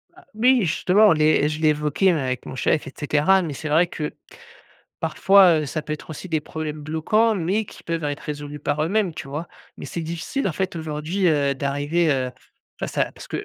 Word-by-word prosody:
A 370 - -18
oui 245 +2 +4
justement, 190 +5 +4
les 155 -1 +3
je 155 +1 -3
l'ai 155 - +4
évoqué 150 +5 +2
même 155 -5 0
avec 130 -1 -3
mon 130 - -7
chef 150 +4 +1
et 135 - -9
cetera. 155 +6 +3
Mais 160 -5 -4
c'est 155 +3 -6
vrai 165 +4 +4
que, 150 -3 -4 0.9
parfois, 190 -5 +5
heu, 150 - -3
ça 150 +2 -3
peut 150 +1 -5
être 155 - -7
aussi 160 +4 -7
des 155 -1 +1
problèmes 155 0 -5
bloquants 215 +9 +1
mais 195 +4 0
qui - - -13
peuvent 165 -1 -3
être 145 0 -3
résolus 145 0 -6
par 150 +1 -1
eux-mêmes, 190 +2 +1
tu 140 - -7
vois? 155 +5 -5 0.3
Mais - - -9
c'est 170 - -5
difficile, 170 - -3
en 170 - -3
fait, 190 +1 -2
aujourd'hui, 160 +4 -2
heu, 140 -3 +2
d'arriver, 145 +5 0
heu, 130 -2 0 0.5
face - - -4
à - - +1
parce - - -12
que, - - -4
155 Hz, 215 wpm, -23 LUFS, 150-180 Hz, 0.9 s, parfois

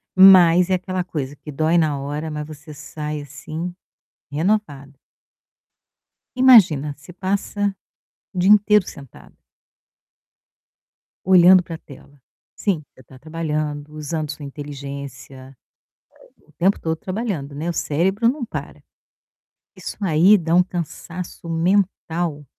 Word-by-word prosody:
Mas 180 -2 +7
é 190 - +3
aquela 185 0 -3
coisa 145 -5 -5
que 150 - -10
dói 160 +4 +1
na 150 -4 +1
hora, 145 +3 -4
mas 150 0 -5
você 150 0 -11
sai, 150 0 -6
assim, 155 +5 -7 0.6
renovada. 145 -4 -2 1.4
Imagina, 185 - +5
você 150 +5 -14
passa 200 +2 -2 0.6
o - - -5
dia 185 +3 +3
inteiro 210 -1 +5
sentada. 140 -3 -13 1.9
Olhando 185 0 +7
pra 165 -2 -8
tela. 140 -1 -16 0.4
Sim, 185 -7 -1
você 130 - -18
tá 130 +2 -16
trabalhando, 150 -1 -4
usando 155 0 -4
sua 145 -1 -9
inteligência, 140 -2 -9 0.8
eh, - - -30
o - - -23
tempo 190 +3 +1
todo 160 0 -2
trabalhando, 185 - -4
né, 160 +4 -3
o 175 - -2
cérebro 190 +10 0
não 265 -2 -3
para. - - -7 1.0
Isso - - -7
aí 185 +2 +5
dá 165 0 -1
um 180 - +6
cansaço 175 0 -7
mental. 170 -3 -1
160 Hz, 120 wpm, -21 LUFS, 145-185 Hz, 1.9 s, Mas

